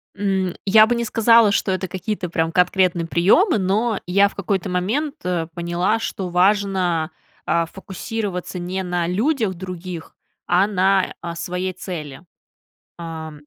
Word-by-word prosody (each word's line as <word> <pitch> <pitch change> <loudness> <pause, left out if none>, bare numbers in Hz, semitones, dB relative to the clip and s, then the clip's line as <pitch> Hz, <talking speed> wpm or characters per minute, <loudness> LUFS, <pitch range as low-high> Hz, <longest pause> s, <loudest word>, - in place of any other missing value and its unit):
М, 190 -3 -1
я 215 +2 +7
бы 240 - +1
не 235 0 -1
сказала, 225 -1 +5
что 195 - +1
это 185 0 -2
какие-то, 190 -1 -4
прям, 165 -1 0
конкретные 180 -1 +2
приемы. 215 - +4
Но, 205 +3 0
я 200 +3 +4
в - - -18
какой-то 195 -1 -2
момент, 225 +12 -1
э, 175 -3 -1
поняла, 175 +6 0
что 190 -4 -4
важно, 180 -3 +1 0.3
а, 170 0 +1
фокусироваться 195 0 -5
не 185 +2 -3
на 175 -1 -1
людях 220 - 0
других, 180 -2 -8 0.3
а 185 +3 +3
на, 190 -1 +2
а, 170 -1 -5
своей 180 +2 -3
цели. 160 -7 -7 0.8
А 160 -2 -6
185 Hz, 145 wpm, -21 LUFS, 175-205 Hz, 0.8 s, я